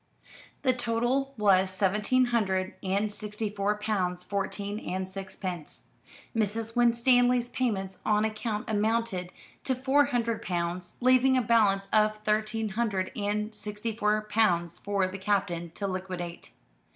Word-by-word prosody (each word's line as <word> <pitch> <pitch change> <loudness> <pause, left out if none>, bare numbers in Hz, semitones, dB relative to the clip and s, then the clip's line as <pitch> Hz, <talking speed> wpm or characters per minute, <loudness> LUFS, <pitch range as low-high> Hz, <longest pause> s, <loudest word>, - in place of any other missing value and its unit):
The 260 -2 +4
total 245 +3 0
was 195 -3 +4
seventeen 210 +7 +2
hundred 190 -4 +1
and 200 +2 0
sixty 210 0 -3
four 205 0 0
pounds 185 -4 -1
fourteen 200 +1 -3
and 185 -3 -3
sixpence. 190 -3 -6 0.5
Mrs. 225 +1 -1
Winstanley's 245 +1 +4
payments 210 -7 -2
on 210 0 +2
account 215 0 -3
amounted 215 -4 0 0.3
to 260 - 0
four 270 +3 +3
hundred 235 -5 -1
pounds; 175 0 -3
leaving 255 +1 +5
a - - +3
balance 205 -4 +3
of 215 0 +3
thirteen 215 +1 0
hundred 195 -3 -1
and 210 0 -2
sixty 210 +1 -4
four 210 -1 +2
pounds 205 -6 +1
for 200 -2 0
the 190 +1 -7
Captain 190 -4 0
to 200 - -3
liquidate. 185 -2 -5
210 Hz, 130 wpm, -28 LUFS, 190-230 Hz, 0.5 s, leaving